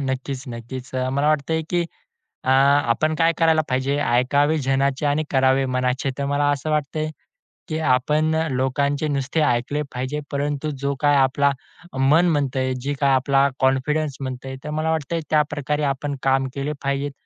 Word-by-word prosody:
नक्कीच-नक्कीच. 130 -1 -6
अ, 130 0 0
मला 140 +2 +1
वाटतंय 155 +2 +1
की 175 -1 +1 0.6
अ, 130 - +1
आपण 140 +2 +3
काय 165 0 +3
करायला 160 -1 +4
पाहिजे, 130 +2 0
"ऐकावे 145 +4 +2
जनाचे 135 +1 +1
आणि 145 +2 +1
करावे 130 0 +3
मनाचे." 130 +1 -1
तर 140 - -1
मला 145 +1 +1
असं 145 +2 -3
वाटतंय 155 +1 -1 0.6
की 155 0 -2 0.2
आपण 155 +5 +1
अ, 160 0 0
लोकांचे 140 +3 0
नुसते 140 +2 -1
ऐकले 125 +5 0
पाहिजे. 130 +4 -3
परंतु 145 +1 -2
जो 140 - +1
काही 145 -1 +4
आपला 140 +1 +3 0.5
मन 155 +6 +4
म्हणतंय 130 -2 0
जी 145 - 0
काय 140 - +4
आपला 135 +1 +3
कॉन्फिडन्स 135 +3 +1
म्हणतंय? 130 0 -5
तर 150 - -6
मला 160 +1 0
वाटतंय 160 +1 -2
त्याप्रकारे 150 -1 0
आपण 140 +1 -4
काम 135 0 +2
केले 140 +2 -2
पाहिजेत. 140 +1 -1
140 Hz, 155 wpm, -22 LUFS, 130-150 Hz, 0.6 s, करायला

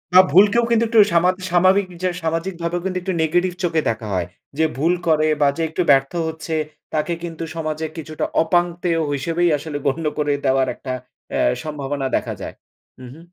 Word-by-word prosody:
বা 185 - +11
ভুলকেও 205 +7 +5
কিন্তু 230 0 +4
একটু 225 -1 +4
সামা 170 +2 +4 0.2
স্বাভাবিক 185 +2 +4 0.2
যে 185 - +2
সামাজিক 165 +3 -1
ভাবে 170 +1 -1
কিন্তু 185 -1 -2
একটু 185 +1 -2
নেগেটিভ 175 +3 +1
চোখে 165 -2 +1
দেখা 110 -1 -3
হয়। 90 -1 -1 0.3
যে 160 - +3
ভুল 165 +5 +2
করে 155 -1 +3
বা 145 - +5
যে - - -2
একটু 170 - -2
ব্যর্থ 135 0 +3 0.2
হচ্ছে 160 0 -4 0.4
তাকে 155 +2 0
কিন্তু 165 -1 -5
সমাজে 155 -1 -3
কিছুটা 155 -1 -4 0.2
অপাংতেয় 175 0 +1
হিসেবেই 165 +5 0
আসলে 145 0 -5
গণ্য 155 +4 0
করে 150 -1 +1
দেওয়ার 130 0 +3
একটা 130 - -7 0.4
এ - - 0 0.2
সম্ভাবনা 145 -2 -4
দেখা - - -1
যায়। - - -6 0.5
উহু। 125 +5 -11
165 Hz, 175 wpm, -21 LUFS, 150-175 Hz, 0.5 s, বা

